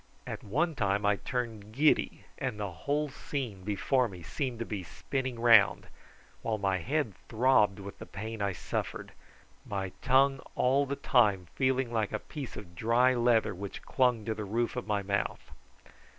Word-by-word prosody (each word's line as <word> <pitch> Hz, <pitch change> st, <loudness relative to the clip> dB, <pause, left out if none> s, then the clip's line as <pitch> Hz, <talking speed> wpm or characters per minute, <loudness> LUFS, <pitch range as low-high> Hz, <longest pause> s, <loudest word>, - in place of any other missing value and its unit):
At -, -, -6 dB
one 155 Hz, -, 0 dB
time 100 Hz, -5 st, 0 dB
I 105 Hz, 0 st, +3 dB
turned 115 Hz, -5 st, -4 dB
giddy 150 Hz, +5 st, +2 dB
and 125 Hz, -6 st, -3 dB
the 100 Hz, -2 st, -3 dB
whole 145 Hz, -, -1 dB
scene 130 Hz, -8 st, -5 dB
before 120 Hz, +6 st, +1 dB
me 90 Hz, -5 st, -10 dB
seemed 130 Hz, -, -3 dB
to 115 Hz, -, -3 dB
be 105 Hz, -3 st, -4 dB
spinning 130 Hz, -, -4 dB
round, 115 Hz, -3 st, +6 dB, 0.6 s
while 110 Hz, -1 st, -1 dB
my 95 Hz, -2 st, 0 dB
head 130 Hz, -, -1 dB, 0.2 s
throbbed 110 Hz, -4 st, +4 dB
with 100 Hz, 0 st, -9 dB
the -, -, -9 dB
pain 110 Hz, +2 st, -6 dB
I 100 Hz, 0 st, +1 dB
suffered, 90 Hz, -, -4 dB, 0.5 s
my 95 Hz, -2 st, -3 dB
tongue 135 Hz, +1 st, +4 dB, 0.2 s
all 135 Hz, +3 st, +3 dB
the 140 Hz, -, -2 dB
time 105 Hz, -9 st, +3 dB
feeling 130 Hz, -2 st, +1 dB
like 110 Hz, -3 st, 0 dB
a -, -, +1 dB
piece 140 Hz, +3 st, -8 dB
of 85 Hz, -4 st, -9 dB
dry 115 Hz, +7 st, +3 dB
leather 120 Hz, -3 st, +3 dB
which 100 Hz, +1 st, -7 dB
clung 125 Hz, -5 st, +2 dB
to 110 Hz, -, 0 dB
the 110 Hz, 0 st, -5 dB
roof 115 Hz, +4 st, -1 dB
of 125 Hz, -, -4 dB
my 105 Hz, -2 st, 0 dB
mouth. 100 Hz, +1 st, -2 dB
115 Hz, 170 wpm, -30 LUFS, 100-130 Hz, 0.6 s, round